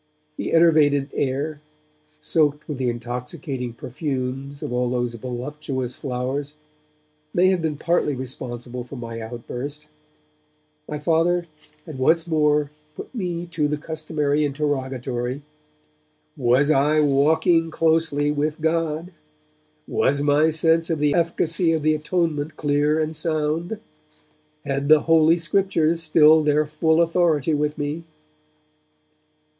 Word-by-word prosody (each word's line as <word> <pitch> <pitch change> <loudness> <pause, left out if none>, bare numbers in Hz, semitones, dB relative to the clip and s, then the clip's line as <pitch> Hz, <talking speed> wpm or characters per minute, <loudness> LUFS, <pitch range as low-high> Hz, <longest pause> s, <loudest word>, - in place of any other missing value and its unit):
The - - -3
enervated 150 -4 +4
air, 145 +3 -2 0.6
soaked 150 -2 +1
with 145 -4 -5
the 125 -2 +1
intoxicating 125 +2 -5
perfumes 135 +2 -4
of - - -4
all 125 0 0
those 120 -1 -1
voluptuous 130 +1 -5
flowers, 135 +2 -4 0.8
may 185 +2 +5
have 185 -2 +1
been 155 -2 -2
partly 160 -3 0
responsible 125 -1 -5
for 125 +3 -10
my 115 -2 -6
outburst. 125 +6 -7 1.0
My 150 - -3
Father 165 +3 +1 0.4
had 155 -6 -8
once 160 +5 +3
more 150 -3 +1 0.2
put - - -9
to 255 - -9
me 175 -2 -3
the 150 -3 -1
customary 150 -1 -1
interrogatory. 130 -3 -2 0.9
Was 130 +4 +3
I 150 +2 +3
'walking 160 +4 +3
closely 160 -3 +1
with 150 +1 -1
God'? 165 +1 -1 0.8
Was 140 +1 +1
my 145 +2 +4
sense 165 +1 +2
of 165 - 0
the 145 -1 +2
efficacy 165 0 +1
of 160 -2 -1
the 155 0 +3
Atonement 155 -1 -1
clear 145 +1 +1
and 155 0 -2
sound? 160 +5 -2 0.9
Had 140 0 -2
the 155 -1 +7
Holy 165 0 +4
Scriptures 165 -2 +1
still 155 0 +5
their 150 0 +2
full 160 +2 +2
authority 165 -3 +1
with 150 0 -1
me? 150 +3 -3
150 Hz, 120 wpm, -23 LUFS, 135-160 Hz, 1.0 s, the